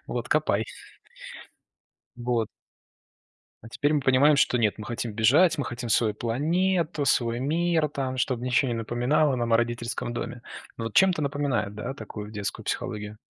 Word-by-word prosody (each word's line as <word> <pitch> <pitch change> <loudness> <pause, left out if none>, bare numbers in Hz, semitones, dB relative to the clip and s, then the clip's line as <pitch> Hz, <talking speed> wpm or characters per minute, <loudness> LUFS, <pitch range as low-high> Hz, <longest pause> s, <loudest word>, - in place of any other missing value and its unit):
Вот 120 -1 -4
копай". 115 -8 +1 1.5
Вот. 120 -2 -1 1.1
А 115 - -11
теперь 145 +5 0
мы 150 - +2
понимаем, 135 +3 +4
что 125 - +3
нет- 110 -4 +2
мы 105 - -6
хотим 120 -1 -4
бежать, 140 - +4
мы 145 - 0
хотим 120 0 -5
свою 110 -1 +2
планету, 160 - 0
свой 120 -2 +1
мир 160 +2 +1
там, 135 -2 -3
чтобы 125 -1 -1
ничего 125 +1 +2
не - - -1
напоминало 125 +6 +1
нам 120 -1 -1
о - - +7
родительском 120 0 -2
доме. 120 0 -5 0.3
Ну 115 - -5
вот 115 - -5
чем-то 185 -4 +4
напоминает, 135 -8 -1
да, 110 +5 -4
такую 105 -6 -8
детскую 105 -2 -5
психологию? 105 0 -4
125 Hz, 160 wpm, -26 LUFS, 115-145 Hz, 1.5 s, о